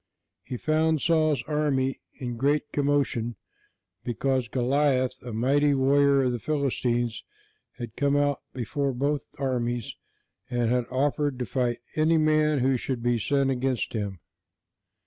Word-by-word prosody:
He 125 Hz, -, -6 dB
found 155 Hz, +2 st, +1 dB
Saul's 155 Hz, -5 st, +2 dB
army 145 Hz, -2 st, 0 dB, 0.2 s
in 120 Hz, -2 st, -4 dB
great 145 Hz, +5 st, 0 dB
commotion, 140 Hz, -5 st, 0 dB, 0.7 s
because 130 Hz, +1 st, 0 dB
Goliath, 130 Hz, +1 st, +1 dB
a 125 Hz, -, -7 dB
mighty 140 Hz, +6 st, +2 dB
warrior 140 Hz, +1 st, +4 dB
of 125 Hz, -, +1 dB
the 120 Hz, -, -3 dB
Philistines, 120 Hz, -5 st, -1 dB, 0.5 s
had 120 Hz, -3 st, -7 dB
come 140 Hz, 0 st, +1 dB
out 145 Hz, -1 st, +1 dB
before 135 Hz, +3 st, -2 dB
both 140 Hz, +3 st, -1 dB
armies 120 Hz, -4 st, -2 dB, 0.5 s
and 120 Hz, -1 st, 0 dB
had 125 Hz, -1 st, +1 dB
offered 140 Hz, +1 st, 0 dB
to 125 Hz, -, -2 dB
fight 120 Hz, +1 st, -1 dB
any 160 Hz, +1 st, +3 dB
man 155 Hz, -2 st, +3 dB
who 130 Hz, 0 st, +2 dB
should 125 Hz, -1 st, -4 dB
be 120 Hz, -1 st, +2 dB
sent 135 Hz, +4 st, +1 dB
against 130 Hz, -1 st, -1 dB
him. 100 Hz, -5 st, -3 dB
135 Hz, 135 wpm, -26 LUFS, 120-145 Hz, 0.7 s, warrior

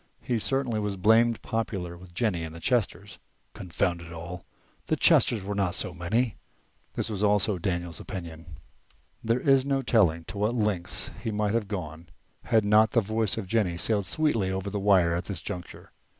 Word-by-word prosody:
He 120 Hz, -2 st, 0 dB
certainly 130 Hz, -2 st, 0 dB
was 105 Hz, -2 st, -2 dB
blamed 115 Hz, +4 st, +3 dB
popular 100 Hz, -6 st, -3 dB
with 90 Hz, 0 st, -15 dB
Jennie 90 Hz, -6 st, 0 dB
and 80 Hz, 0 st, -7 dB
the -, -, -8 dB
Chesters. 100 Hz, -1 st, -1 dB, 0.3 s
Confound 85 Hz, -1 st, -2 dB
it 85 Hz, 0 st, -11 dB
all, 85 Hz, +2 st, -7 dB, 0.4 s
the -, -, +2 dB
Chesters 110 Hz, -5 st, +4 dB
were 100 Hz, +1 st, -3 dB
not 100 Hz, -3 st, 0 dB
so 90 Hz, -, -1 dB
many! 105 Hz, +7 st, -1 dB, 0.6 s
(this -, -, -2 dB
also 105 Hz, 0 st, +3 dB
was 90 Hz, -, -6 dB
Daniel's 85 Hz, -3 st, -2 dB
opinion). 85 Hz, -4 st, -8 dB, 0.7 s
There 115 Hz, +2 st, +1 dB
is 135 Hz, 0 st, +4 dB
no 135 Hz, -1 st, 0 dB
telling 90 Hz, -9 st, +3 dB
to 95 Hz, +5 st, -7 dB
what 105 Hz, +4 st, +1 dB
lengths 105 Hz, -6 st, -1 dB
he 115 Hz, -, -1 dB
might 105 Hz, -1 st, 0 dB
have 115 Hz, -3 st, 0 dB
gone 85 Hz, -5 st, -6 dB, 0.4 s
had 110 Hz, -3 st, +3 dB
not 105 Hz, +1 st, +4 dB
the 115 Hz, -, +4 dB
voice 110 Hz, -1 st, 0 dB
of 110 Hz, -, -3 dB
Jennie 95 Hz, -4 st, 0 dB
sailed 100 Hz, +1 st, 0 dB
sweetly 130 Hz, -12 st, +1 dB
over 95 Hz, +1 st, -3 dB
the 100 Hz, -, -2 dB
wire 95 Hz, -4 st, +4 dB
at 85 Hz, 0 st, -3 dB
this 95 Hz, -4 st, -4 dB
juncture. 90 Hz, 0 st, -8 dB
100 Hz, 180 wpm, -27 LUFS, 85-110 Hz, 0.7 s, Chesters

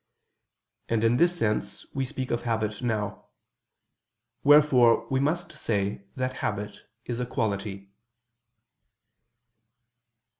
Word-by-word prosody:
And 115 Hz, -1 st, +1 dB
in 115 Hz, +2 st, +4 dB
this 175 Hz, +4 st, +3 dB
sense 110 Hz, -5 st, -1 dB
we 135 Hz, -1 st, -1 dB
speak 130 Hz, 0 st, -5 dB
of 120 Hz, -, 0 dB
habit 110 Hz, -2 st, -2 dB
now. 110 Hz, -4 st, -2 dB, 1.2 s
Wherefore 135 Hz, -6 st, +6 dB
we 130 Hz, -, +2 dB
must 170 Hz, +5 st, 0 dB
say 100 Hz, -2 st, -2 dB
that 130 Hz, 0 st, -2 dB
habit 105 Hz, 0 st, -3 dB, 0.3 s
is 120 Hz, -1 st, -3 dB
a 125 Hz, -, -1 dB
quality. 100 Hz, -5 st, -3 dB
115 Hz, 105 wpm, -27 LUFS, 105-130 Hz, 1.2 s, Wherefore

